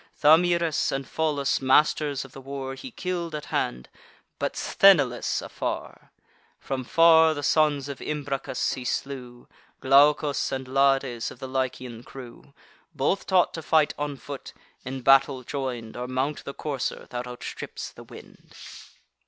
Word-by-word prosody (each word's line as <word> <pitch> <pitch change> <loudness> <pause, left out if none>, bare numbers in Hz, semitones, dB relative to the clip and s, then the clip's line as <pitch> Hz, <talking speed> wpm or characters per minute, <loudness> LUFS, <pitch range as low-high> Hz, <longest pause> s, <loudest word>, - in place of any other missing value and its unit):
Thamyris 170 +1 +4
and 135 0 -3
Pholus, 150 -4 0
masters 140 +1 +2
of 135 - -14
the 135 - -11
war, 135 0 -5
He 195 - -8
kill'd 180 -7 -4
at 150 - -5
hand, 60 +1 -1 0.5
but - - -2
Sthenelus 145 -11 +3
afar: - - -5 0.5
From 135 -1 -4
far 160 +3 +5
the 145 - -5
sons 150 -2 +2
of 140 -2 -6
Imbracus 140 -3 -2
he 130 - -6
slew, 125 -2 -5 0.3
Glaucus 145 +2 +3
and 130 -1 -4
Lades, 135 -3 +1
of - - -12
the 130 +2 -7
Lycian 130 -2 -3
crew; 125 +1 -12 0.4
Both 165 +9 0
taught 185 -2 +3
to 165 - -5
fight 155 -1 +2
on 145 -1 -3
foot, 140 0 -9 0.3
in 130 +1 -5
battle 135 0 +4
join'd, 125 -4 -5
Or 125 0 -4
mount 130 +3 -2
the 140 - -6
courser 140 -4 -4
that 125 0 -4
outstrips 125 0 -7
the - - -13
wind. - - -15
135 Hz, 145 wpm, -26 LUFS, 130-150 Hz, 0.5 s, far